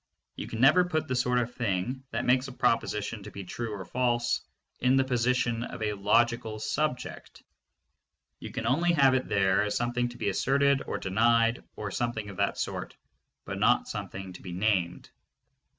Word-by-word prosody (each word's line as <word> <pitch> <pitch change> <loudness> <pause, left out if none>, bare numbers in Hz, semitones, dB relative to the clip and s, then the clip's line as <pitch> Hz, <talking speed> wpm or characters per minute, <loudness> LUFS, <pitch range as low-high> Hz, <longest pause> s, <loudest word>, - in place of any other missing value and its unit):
You - - -6
can 115 - -6
never 155 +8 +6
put 160 -3 -1
the 130 - -1
sort 125 0 +1
of 120 0 -1
thing 115 +3 -2
that 115 +2 -2
makes 130 +2 +3
a - - -7
proposition 115 -3 0
to 100 - -9
be 100 -1 -8
true 115 +5 -5
or 100 -3 -6
false 120 -1 0 0.4
in 125 +1 +3
the 135 - +4
position 125 -2 +1
of 110 - -6
a 105 -1 0
logical 110 +2 +1
subject. 125 +4 -3 1.0
You - - -7
can 115 - -4
only 170 +9 +2
have 135 -4 +5
it 130 -1 0
there 95 -1 +3
as 105 0 -1
something 120 +1 0
to 120 - -11
be - - -1
asserted 140 +6 +2
or - - -2
denied 115 +4 +2
or 105 -1 -5
something 110 -3 -2
of 95 - -12
that - - 0
sort, - - -4 0.5
but - - -5
not - - +3
something 95 -1 -6
to 90 - -11
be 90 - -7
named. 90 -3 0
120 Hz, 180 wpm, -28 LUFS, 105-125 Hz, 1.0 s, never